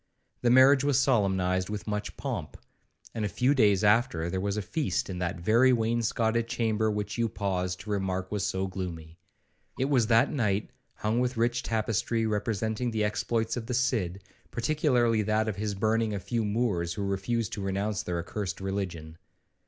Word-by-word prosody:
The 120 Hz, -, +3 dB
marriage 130 Hz, +2 st, +6 dB
was 140 Hz, -2 st, +3 dB
solemnized 95 Hz, -8 st, +1 dB
with 105 Hz, -1 st, -4 dB
much 105 Hz, -1 st, -4 dB
pomp, -, -, -4 dB, 0.6 s
and 115 Hz, -, -3 dB
a 105 Hz, -, 0 dB
few 125 Hz, +7 st, +2 dB
days 105 Hz, -6 st, +3 dB
after 105 Hz, -6 st, +2 dB
there 95 Hz, -, -1 dB
was 100 Hz, +1 st, -1 dB
a -, -, 0 dB
feast 135 Hz, -, -2 dB
in 90 Hz, -, -5 dB
that 85 Hz, -1 st, -2 dB
very 115 Hz, +8 st, +4 dB
wainscotted 115 Hz, 0 st, +1 dB
chamber 110 Hz, -2 st, 0 dB
which 105 Hz, +1 st, -3 dB
you 115 Hz, -1 st, +1 dB
paused 90 Hz, -4 st, -2 dB
to 105 Hz, -, -7 dB
remark 95 Hz, -2 st, -2 dB
was 105 Hz, -2 st, -1 dB
so 95 Hz, 0 st, -1 dB
gloomy. 85 Hz, -4 st, -6 dB, 0.6 s
It 135 Hz, +2 st, 0 dB
was 125 Hz, -5 st, +3 dB
that 115 Hz, +4 st, +4 dB
night 105 Hz, -7 st, 0 dB, 0.2 s
hung 110 Hz, +3 st, 0 dB
with 125 Hz, 0 st, -1 dB
rich 120 Hz, +1 st, +1 dB
tapestry, 115 Hz, 0 st, 0 dB
representing 110 Hz, +2 st, -1 dB
the 110 Hz, -2 st, -1 dB
exploits 110 Hz, +2 st, -1 dB
of 115 Hz, -2 st, -5 dB
the 125 Hz, -, -1 dB
Cid, 105 Hz, -8 st, 0 dB, 0.3 s
particularly 120 Hz, -4 st, +2 dB
that 110 Hz, +1 st, +1 dB
of 105 Hz, -3 st, -2 dB
his 105 Hz, 0 st, -2 dB
burning 110 Hz, +1 st, +1 dB
a -, -, -2 dB
few 110 Hz, +5 st, -2 dB
Moors 100 Hz, -6 st, 0 dB
who 100 Hz, -, -3 dB
refused 100 Hz, +3 st, -1 dB
to 105 Hz, -, -4 dB
renounce 100 Hz, +1 st, -1 dB
their 90 Hz, -1 st, -3 dB
accursed 95 Hz, +2 st, -4 dB
religion. 90 Hz, -5 st, -4 dB
105 Hz, 175 wpm, -28 LUFS, 95-115 Hz, 0.6 s, marriage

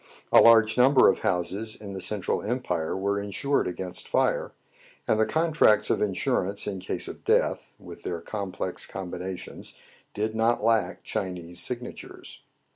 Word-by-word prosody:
A -, -, +8 dB
large 115 Hz, 0 st, +6 dB
number 130 Hz, +1 st, +6 dB
of -, -, +1 dB
houses 95 Hz, +5 st, -1 dB
in 100 Hz, -2 st, -9 dB
the 95 Hz, -, -5 dB
Central 105 Hz, -1 st, -1 dB
Empire 95 Hz, -9 st, -2 dB
were 100 Hz, +1 st, 0 dB
insured 120 Hz, +8 st, -1 dB
against 90 Hz, 0 st, -4 dB
fire; -, -, +1 dB, 0.6 s
and 110 Hz, -, +2 dB
the 110 Hz, -, +3 dB
contracts 160 Hz, -10 st, +3 dB
of -, -, 0 dB
insurance 100 Hz, -1 st, 0 dB
in 100 Hz, -2 st, -4 dB
case 90 Hz, -, -3 dB
of -, -, -9 dB
death, -, -, +1 dB
with -, -, -12 dB
their 85 Hz, -2 st, -4 dB
complex 95 Hz, 0 st, -4 dB
combinations, 95 Hz, 0 st, -6 dB, 0.4 s
did 110 Hz, +1 st, -1 dB
not 115 Hz, 0 st, +1 dB
lack 115 Hz, -1 st, +1 dB
Chinese 90 Hz, -2 st, -4 dB
signatures. 125 Hz, +3 st, -5 dB
100 Hz, 145 wpm, -26 LUFS, 95-115 Hz, 0.6 s, A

